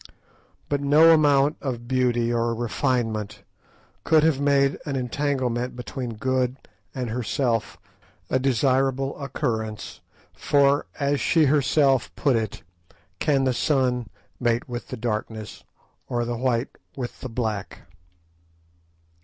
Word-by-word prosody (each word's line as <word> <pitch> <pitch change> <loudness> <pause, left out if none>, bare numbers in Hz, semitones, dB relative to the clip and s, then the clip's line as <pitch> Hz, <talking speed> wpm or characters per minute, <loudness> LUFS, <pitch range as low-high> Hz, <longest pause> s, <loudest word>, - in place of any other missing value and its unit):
But 145 -1 -1
no 155 +4 +6
amount 145 -1 +3
of 120 -4 -4
beauty 120 -2 +1
or 115 0 0
refinement 115 -3 -2 0.6
could 160 -2 +4
have 155 -4 +2
made 140 -1 +2
an 140 - -3
entanglement 125 -2 -1
between 125 -1 -5
Good 130 +2 0 0.4
and 125 -3 -3
herself 120 -1 -1 0.5
a 130 - +1
desirable 135 +1 +1
occurrence; 110 -6 -3 0.3
for, 140 0 +2
as 140 0 +1
she 160 -3 +3
herself 135 -2 +3
put 140 -4 +2
it, 110 -3 -3 0.6
"Can 140 -3 +2
the 130 -1 +2
sun 125 -3 +1 0.3
mate 120 -1 0
with 120 -1 -6
the 130 - -6
darkness, 110 -2 -4 0.4
or 120 -1 -1
the 120 0 -2
white 120 0 -1 0.2
with 125 -3 -6
the 130 - -5
black?" 110 -4 -3
130 Hz, 120 wpm, -24 LUFS, 120-140 Hz, 0.6 s, no